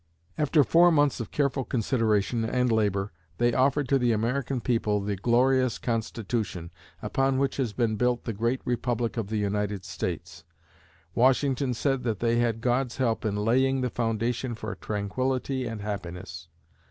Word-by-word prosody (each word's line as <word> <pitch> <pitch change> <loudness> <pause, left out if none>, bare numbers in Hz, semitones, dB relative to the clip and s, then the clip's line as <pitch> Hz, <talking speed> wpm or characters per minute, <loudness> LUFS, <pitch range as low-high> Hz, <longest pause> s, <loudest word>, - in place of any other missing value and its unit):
After 150 0 +3
four 170 +5 +5
months 145 -5 +2
of 115 - -5
careful 140 -2 0
consideration 115 -2 0
and 125 +2 +1
labor, 105 -2 +1 0.3
they 120 0 +2
offered 135 +2 +2
to 135 - +3
the 120 -2 +2
American 125 +4 -1
people 115 -3 0
the 100 0 -2
glorious 125 +3 +2
Constitution, 110 -6 -3 0.3
upon 135 0 +1
which 135 0 0
has 130 -5 0
been 110 -1 0
built 125 +1 +1
up - - -34
the 115 - -2
great 115 +5 -1
Republic 120 -1 -1
of 115 -4 -2
the 110 +1 -2
United 105 -1 -1
States. 85 -1 -5 0.7
Washington 130 - +2
said 135 +1 0
they 115 +1 0
had 115 -2 0
God's 125 +1 0
help 120 -4 0
in 105 -2 0
"laying 130 +5 +2
the 125 -2 -1
foundation 115 +1 -1
for 110 0 -5
tranquillity 130 +5 -2
and 115 -2 -5
happiness." 90 -4 -6
120 Hz, 155 wpm, -27 LUFS, 105-130 Hz, 0.7 s, four